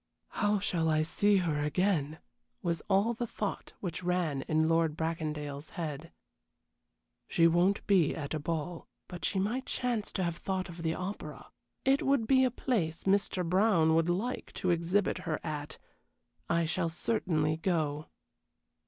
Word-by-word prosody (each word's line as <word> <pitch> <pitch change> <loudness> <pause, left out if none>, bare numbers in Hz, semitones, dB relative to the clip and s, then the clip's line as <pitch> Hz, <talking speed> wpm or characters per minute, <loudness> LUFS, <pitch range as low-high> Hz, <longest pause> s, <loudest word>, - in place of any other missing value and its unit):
"How 210 -1 +1
shall 175 -5 0
I 155 0 +3
see 205 +5 +3
her 165 -5 0
again?" 155 -1 +1 0.5
was 170 -3 -1
all 200 +4 +3
the 240 +1 -3
thought 210 -2 -4
which 180 -2 -4
ran 175 -6 0
in 155 0 +2
Lord 165 -1 +2
Bracondale's 155 -3 -3
head. 160 -1 -4 1.2
"She 165 - +3
won't 175 +4 +3
be 180 -7 +3
at 145 -2 -4
a 155 - -1
ball, 165 +2 -3 0.2
but 175 -1 -8
she - - 0
might 230 +7 -1
chance 240 -4 -1
to 190 - 0
have 170 -1 -2
thought 190 -1 -3
of 170 0 -8
the 160 0 0
opera. 190 +3 -6 0.3
It 270 +1 +4
would 275 -4 +2
be 260 +2 +5
a 255 - +4
place 200 -10 -1
Mr. 195 -2 +1
Brown 180 -3 +4
would 165 +1 +3
like 210 +9 -2
to 185 - 0
exhibit 175 +4 +1
her 155 - -2
at. 150 -2 -5 0.7
I 170 0 +2
shall 170 +1 0
certainly 160 -4 0
go." 155 -4 -1
170 Hz, 155 wpm, -31 LUFS, 160-200 Hz, 1.2 s, be